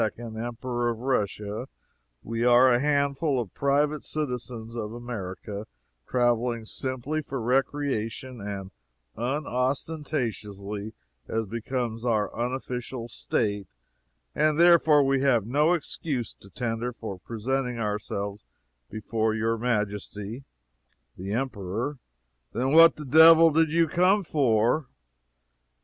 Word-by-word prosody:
Emperor 120 +1 -3
of 115 - -2
Russia: 105 -2 -2 0.6
"We 115 +1 -2
are 125 +1 +6
a 120 - +4
handful 140 0 +1
of 110 -7 -5
private 145 +1 +1
citizens 125 -6 -4
of 110 -2 -4
America, 105 -3 -6 0.4
traveling 120 -2 +1
simply 130 +6 -3
for 135 -2 -5
recreation, 130 -1 -1
and 100 -1 -6 0.4
unostentatiously, 125 -6 -3 0.3
as 115 0 -1
becomes 115 +1 -3
our 110 -4 0
unofficial 125 -1 -4
state 105 -3 -1 0.7
and 155 0 +2
therefore, 165 -4 +6
we 135 -1 +2
have 125 -7 +3
no 150 +8 +3
excuse 145 - -3
to 100 - -17
tender 120 +1 -3
for 110 -6 -7
presenting 125 +4 -2
ourselves 105 -2 -3 0.5
before 110 +1 -1
your 115 +1 0
Majesty 105 +1 -3 0.3
" - - -46
The 95 +2 -6
Emperor 120 +2 -3 0.5
"Then 125 +4 0
what 165 +2 +8
the 150 - -8
devil 160 +3 +8
did 160 0 +3
you 165 0 +3
come 185 +6 +3
for?" 125 -2 +2
120 Hz, 110 wpm, -26 LUFS, 110-140 Hz, 0.7 s, what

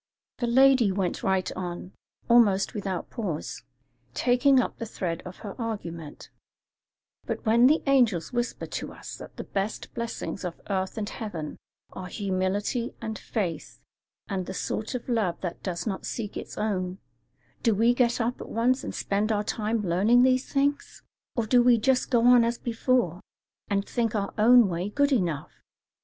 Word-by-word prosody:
The 240 - 0
lady 260 -3 +5
went 190 -2 -1
right 190 -1 0
on, 180 0 -5 0.4
almost 210 -5 +4
without 195 -5 -4
pause, 190 - -4 0.5
taking 255 +2 +4
up 250 - -1
the 230 - -4
thread 175 -5 -3
of 180 - -9
her 200 - -5
argument: 170 -9 -6 1.0
"But - - -4
when 235 +3 +6
the 310 +4 +3
angels 245 - +2
whisper 240 0 -2
to - - -5
us - - -9
that - - -11
the - - -4
best 200 +2 -4
blessings 235 -4 -4
of 175 -2 -5
earth 190 +1 -1
and 210 -2 -2
heaven 170 -11 -6 0.4
are 185 -1 -6
humility 200 +5 -1
and 220 -1 -5
faith 165 - -4 0.5
and 190 -2 -3
the 190 - -5
sort 220 +6 -3
of 245 - -5
love 220 -8 0
that 180 -2 -5
does 175 -2 -3
not 195 -3 -3
seek 215 -3 -4
its - - -7
own, 185 -4 -1 0.6
do 225 -3 +3
we 230 +4 +4
get 245 -1 +2
up 240 +2 -1
at - - -8
once 250 +4 +1
and - - -5
spend 205 +2 0
our 210 -1 +1
time 215 +1 -1
learning 205 +8 +4
these 255 0 +2
things? 285 +1 -1 0.3
or 235 - 0
do 245 +3 +5
we 240 -1 +5
just 255 +3 +1
go 235 -2 +3
on 245 -1 +7
as 235 0 0
before, 230 -6 0 0.5
and 200 -1 0
think 230 -2 -1
our 200 -1 -2
own 240 +1 +7
way 180 +2 -2
good 285 +6 +2
enough? 165 - -1
215 Hz, 170 wpm, -27 LUFS, 185-240 Hz, 1.0 s, on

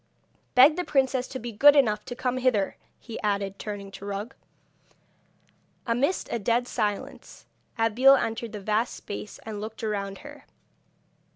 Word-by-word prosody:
Beg 275 +6 +7
the 360 - 0
princess 265 -4 +1
to - - -6
be 240 -1 -6
good 285 +7 +7
enough 215 -7 +3
to 245 - -6
come 255 0 -1
hither,' 245 -7 +1 0.2
he 230 - -8
added, 200 -2 -1
turning 200 -2 -6
to 195 - -11
Rug. 205 +5 -5 1.5
Amidst 260 +10 0
a 235 - -1
dead 235 +4 +1
silence 205 -3 -4 0.3
Abeille 235 +5 +5
entered 225 -2 -2
the 210 - -6
vast 215 +4 0
space 205 0 -7
and 215 -2 -5
looked 220 +1 -7
around 200 -2 -3
her. 290 0 -12
225 Hz, 150 wpm, -26 LUFS, 205-255 Hz, 1.5 s, Beg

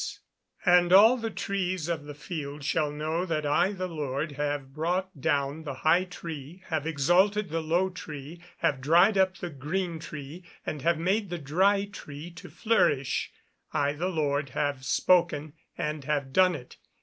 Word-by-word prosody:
[Verse: - - -5 0.5
"And 180 -1 +5
all 215 +6 +8
the 225 -2 -3
trees 185 -5 -2
of 165 -4 -2
the 145 -1 -8
field 145 -2 -6
shall 150 +1 +1
know 155 +3 -2
that 155 -4 -2
I 145 +7 +3
the 185 -2 -3
Lord 150 -2 -3
have 145 -1 -3
brought 175 +1 -2
down 140 +3 0
the 145 -4 -5
high 170 +4 +5
tree, 170 -1 -8
have 160 -2 -1
exalted 185 +7 +2
the 165 +1 -1
low 170 +4 +1
tree, 155 -1 -8 0.2
have 135 -2 +1
dried 175 +9 +5
up 190 -1 +2
the 175 -2 -5
green 165 +5 -3
tree, 155 +2 -8 0.2
and 150 - -4
have 170 +2 +2
made 195 +5 0
the 175 - -3
dry 190 +7 +2
tree 165 -5 -9
to 170 - -11
flourish: 145 - +1 0.4
I 145 0 +1
the 170 +5 -2
Lord 145 -4 0
have 145 -2 -1
spoken, 155 -1 +2 0.2
and 150 -1 -3
have 140 -3 -1
done 185 -2 +5
it." 125 -4 -10
160 Hz, 170 wpm, -28 LUFS, 145-185 Hz, 0.5 s, all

